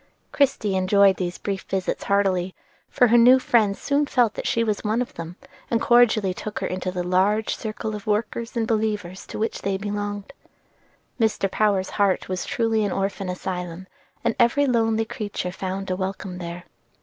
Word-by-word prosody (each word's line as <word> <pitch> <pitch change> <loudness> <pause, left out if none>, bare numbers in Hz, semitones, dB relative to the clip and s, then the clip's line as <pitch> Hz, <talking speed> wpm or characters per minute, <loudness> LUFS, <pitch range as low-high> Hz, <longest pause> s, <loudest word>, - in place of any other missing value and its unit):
Christie 235 -8 +1
enjoyed 190 +1 +4
these 180 -1 -3
brief 195 -2 -3
visits 190 -1 -3
heartily, 190 -2 +1 0.3
for 245 - +3
her 240 +1 +6
new 250 +2 +8
friends 220 -6 +2
soon 285 +1 +1
felt 245 -6 +2
that - - -4
she 230 - +1
was 215 -2 -1
one 215 +2 0
of 250 - -3
them, 165 +1 -7 0.3
and 230 - +2
cordially 230 -6 +4
took 210 +3 -6
her - - -2
into 185 0 -3
the 180 -1 -3
large 190 +5 +1
circle 220 -1 -4
of 210 0 -9
workers 230 +3 -2
and 225 - +1
believers 210 -4 -2
to - - -7
which 220 +1 -2
they 195 0 -1
belonged. 205 +2 -4 0.9
Mr. 215 -4 +1
Power's 200 -3 +1
heart 200 -3 +1
was 185 0 -3
truly 225 -2 +1
an 205 - -1
orphan 195 0 -2
asylum, 180 -1 -5 0.4
and 235 -1 +1
every 240 +4 +4
lonely 225 -3 +1
creature 205 -5 -4
found 190 +1 -4
a - - +1
welcome 190 -1 -4
there. 170 0 -6
205 Hz, 175 wpm, -24 LUFS, 185-225 Hz, 0.9 s, new